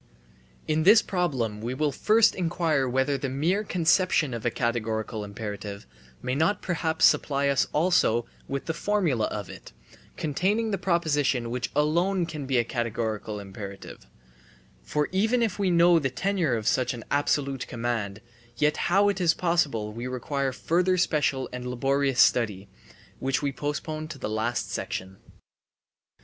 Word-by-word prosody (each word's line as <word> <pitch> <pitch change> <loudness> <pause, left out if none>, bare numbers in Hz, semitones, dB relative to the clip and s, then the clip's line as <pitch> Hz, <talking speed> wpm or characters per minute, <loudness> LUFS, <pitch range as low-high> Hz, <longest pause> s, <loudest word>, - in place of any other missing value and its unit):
In 155 +1 +1
this 210 +7 +7
problem 130 - -1
we 120 +3 -3
will 150 +1 0
first 215 +10 +4
inquire 165 -6 0
whether 130 +2 +1
the 135 - -2
mere 165 +10 0
conception 175 - +2
of 115 -2 -5
a 120 - +2
categorical 110 -2 -2
imperative 100 -1 -6 0.4
may 125 - -1
not 160 +8 +1
perhaps 160 -3 +1
supply 140 -1 +2
us 140 - +2
also 150 -8 +2 0.2
with 140 0 -4
the 160 - -2
formula 165 - 0
of 105 -3 -5
it, - - -11 0.4
containing 200 +9 0
the 195 - -1
proposition 145 -9 +1
which 125 0 -2
alone 170 +5 +2
can 150 -4 -6
be 130 -2 +1
a 120 - +4
categorical 110 -3 -3
imperative; 100 0 -9 0.7
for 150 0 -1
even 220 +6 +2
if 210 -3 -2
we 195 -2 +2
know 170 0 +5
the 135 -3 -1
tenor 170 -1 0
of 110 -2 -4
such 125 -1 +1
an 115 - -8
absolute 140 -2 0
command, 115 -4 -3 0.4
yet 150 +3 +2
how 200 +3 +4
it 200 -2 0
is 170 -1 +3
possible 145 -12 0
will 120 +3 -5
require 135 +2 -2
further 180 +7 +1
special 145 -6 +1
and 125 0 -5
laborious 135 +1 0
study, 105 -7 +3 0.5
which 135 +2 -1
we 140 - 0
postpone 150 +3 -4
to 155 -3 -8
the - - -4
last 110 +3 -2
section. 95 +1 -4
140 Hz, 155 wpm, -26 LUFS, 120-170 Hz, 0.7 s, this